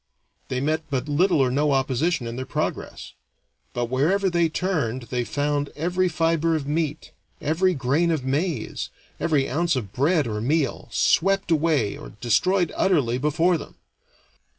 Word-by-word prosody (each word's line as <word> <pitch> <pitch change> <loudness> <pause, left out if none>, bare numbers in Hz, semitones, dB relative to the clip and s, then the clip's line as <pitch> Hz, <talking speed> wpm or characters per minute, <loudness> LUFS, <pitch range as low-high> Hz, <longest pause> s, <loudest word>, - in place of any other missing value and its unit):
They 130 - -2
met 155 +3 -1
but 135 0 -2
little 175 +6 +2
or 130 -2 +3
no 145 +2 +2
opposition 135 +2 0
in 115 0 -5
their 130 - -4
progress; - - -4 0.6
but 120 0 -1
wherever 170 +11 +1
they 170 -1 +2
turned 150 -9 -1
they 125 -1 0
found 145 +4 -1
every 180 +4 0
fiber 165 0 +1
of 150 -3 -2
meat, 150 0 -2 0.3
every 175 +5 +1
grain 140 +6 +1
of 155 -6 -1
maize, 145 -1 -2 0.3
every 145 -5 +1
ounce 165 +3 0
of 105 -7 -4
bread 150 +4 +2
or 105 -2 -3
meal, 140 +1 -1
swept 195 +6 +2
away 155 -9 +1
or - - -10
destroyed 175 - +2
utterly 140 -11 +2
before 165 +4 +2
them. - - -11
150 Hz, 150 wpm, -24 LUFS, 130-170 Hz, 0.6 s, or